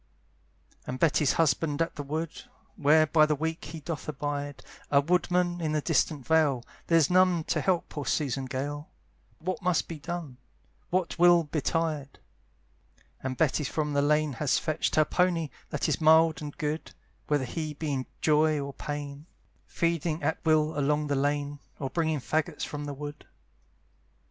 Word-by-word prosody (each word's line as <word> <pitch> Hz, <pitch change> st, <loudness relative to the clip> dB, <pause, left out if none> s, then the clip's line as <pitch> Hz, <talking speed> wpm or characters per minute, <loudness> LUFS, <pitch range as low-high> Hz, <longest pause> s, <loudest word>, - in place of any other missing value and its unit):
And 130 Hz, -, -3 dB
Betty's 150 Hz, -3 st, +3 dB
husband's 160 Hz, -1 st, +2 dB
at 165 Hz, -, -5 dB
the -, -, -4 dB
wood, 155 Hz, +3 st, -4 dB, 0.3 s
Where 155 Hz, +2 st, +5 dB
by 155 Hz, 0 st, +4 dB
the 150 Hz, -, +1 dB
week 160 Hz, +3 st, -3 dB
he 160 Hz, +1 st, -7 dB
doth 155 Hz, 0 st, -5 dB
abide, 145 Hz, 0 st, -4 dB, 0.3 s
A 140 Hz, -, +5 dB
woodman 175 Hz, +2 st, +1 dB
in 155 Hz, -2 st, -1 dB
the 155 Hz, -, +1 dB
distant 150 Hz, -3 st, 0 dB
vale; 145 Hz, -4 st, +3 dB, 0.2 s
There's 165 Hz, -2 st, +4 dB
none 180 Hz, -2 st, +4 dB
to -, -, -1 dB
help 185 Hz, -3 st, +1 dB
poor 145 Hz, -3 st, -6 dB
Susan 135 Hz, -3 st, 0 dB
Gale, 145 Hz, +3 st, -4 dB, 0.5 s
What 185 Hz, +6 st, -4 dB
must 180 Hz, -3 st, +1 dB
be 165 Hz, -2 st, -7 dB
done? 165 Hz, -5 st, -6 dB, 0.5 s
what 180 Hz, -1 st, -1 dB
will 175 Hz, -1 st, +6 dB
betide? 155 Hz, -1 st, -2 dB, 1.0 s
And 130 Hz, -1 st, -4 dB
Betty 155 Hz, -1 st, +2 dB
from 150 Hz, +1 st, -2 dB
the 140 Hz, -, +3 dB
lane 150 Hz, 0 st, +2 dB
has 130 Hz, +1 st, +1 dB
fetched 155 Hz, -2 st, -1 dB
Her 155 Hz, -, +5 dB
pony, 170 Hz, -3 st, +1 dB, 0.2 s
that 150 Hz, -, -1 dB
is -, -, 0 dB
mild 160 Hz, +1 st, +5 dB
and 145 Hz, -1 st, -7 dB
good, 150 Hz, +1 st, -3 dB, 0.3 s
Whether 145 Hz, -3 st, +1 dB
he 155 Hz, +3 st, -4 dB
be 150 Hz, -1 st, -3 dB
in 130 Hz, -1 st, -2 dB
joy 155 Hz, 0 st, +3 dB
or 140 Hz, 0 st, -5 dB
pain, 145 Hz, +1 st, -6 dB, 0.4 s
Feeding 165 Hz, -1 st, -1 dB
at 160 Hz, -, -1 dB
will 155 Hz, -2 st, +2 dB
along 150 Hz, +2 st, +1 dB
the 140 Hz, -, +1 dB
lane, 145 Hz, +1 st, -1 dB, 0.2 s
Or 135 Hz, -2 st, -4 dB
bringing 160 Hz, -4 st, 0 dB
faggots 155 Hz, +3 st, -1 dB
from 145 Hz, 0 st, -5 dB
the 145 Hz, -1 st, -5 dB
wood. 145 Hz, +1 st, -8 dB
150 Hz, 165 wpm, -28 LUFS, 145-165 Hz, 1.0 s, will